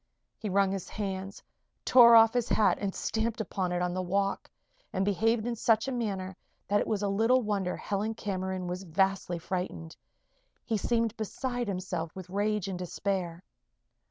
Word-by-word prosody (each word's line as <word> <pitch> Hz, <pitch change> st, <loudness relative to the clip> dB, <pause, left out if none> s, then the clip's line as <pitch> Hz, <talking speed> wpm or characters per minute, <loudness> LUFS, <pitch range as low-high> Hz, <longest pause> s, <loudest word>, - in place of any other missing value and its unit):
He 215 Hz, -, -4 dB
wrung 195 Hz, 0 st, +3 dB
his 195 Hz, -2 st, -4 dB
hands, 195 Hz, -1 st, -5 dB, 0.4 s
tore 235 Hz, -2 st, +8 dB
off 225 Hz, 0 st, +7 dB
his 245 Hz, -1 st, 0 dB
hat 215 Hz, -, +3 dB
and 200 Hz, -2 st, -2 dB
stamped 225 Hz, +1 st, -2 dB
upon 190 Hz, -3 st, -2 dB
it 180 Hz, 0 st, 0 dB
on 180 Hz, 0 st, -1 dB
the 185 Hz, -, -1 dB
walk, 195 Hz, +2 st, -1 dB, 0.4 s
and 190 Hz, 0 st, 0 dB
behaved 220 Hz, +3 st, +1 dB
in 240 Hz, -1 st, -1 dB
such 225 Hz, +1 st, +2 dB
a -, -, -1 dB
manner 195 Hz, -6 st, -3 dB, 0.3 s
that 205 Hz, +1 st, +3 dB
it -, -, -2 dB
was 210 Hz, -2 st, -1 dB
little 225 Hz, +6 st, +3 dB
wonder 200 Hz, -4 st, -1 dB
Helen 210 Hz, +2 st, -2 dB
Cameron 190 Hz, -3 st, -3 dB
was 180 Hz, +1 st, -4 dB
vastly 190 Hz, 0 st, 0 dB
frightened. 170 Hz, -2 st, -4 dB, 0.7 s
He 225 Hz, -3 st, 0 dB
seemed 230 Hz, +1 st, 0 dB
beside 245 Hz, +2 st, -3 dB
himself 180 Hz, -4 st, -4 dB
with 185 Hz, -1 st, -9 dB
rage 205 Hz, 0 st, 0 dB
and 185 Hz, -2 st, -4 dB
despair. 180 Hz, -1 st, -3 dB
200 Hz, 165 wpm, -29 LUFS, 185-220 Hz, 0.7 s, tore